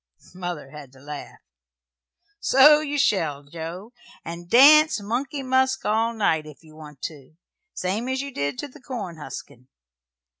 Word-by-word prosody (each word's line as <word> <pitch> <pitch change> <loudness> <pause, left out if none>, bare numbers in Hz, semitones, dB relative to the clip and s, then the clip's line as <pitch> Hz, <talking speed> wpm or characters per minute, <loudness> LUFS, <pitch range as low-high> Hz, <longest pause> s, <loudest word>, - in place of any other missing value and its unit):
Mother 175 -6 -6
had 145 -4 -11
to 135 - -17
laugh. 145 +1 -9 1.0
"So 295 0 +6
you 295 -1 -3
shall, 160 - +1
Joe, 170 - -8 0.3
and 170 +1 -8
dance 305 - +7
'Money 265 +7 -3
Musk' 260 0 +1
all 225 +2 +1
night, 160 -8 0
if 150 +2 -14
you 155 -1 -17
want 150 -3 -13
to 150 -1 -8 0.4
same 205 +7 -2
as 260 0 -1
you 280 +1 -4
did 140 - -2
to - - -5
the 285 +1 -17
corn 210 -10 -6
huskin'. 130 -3 -10
185 Hz, 150 wpm, -24 LUFS, -, 1.0 s, dance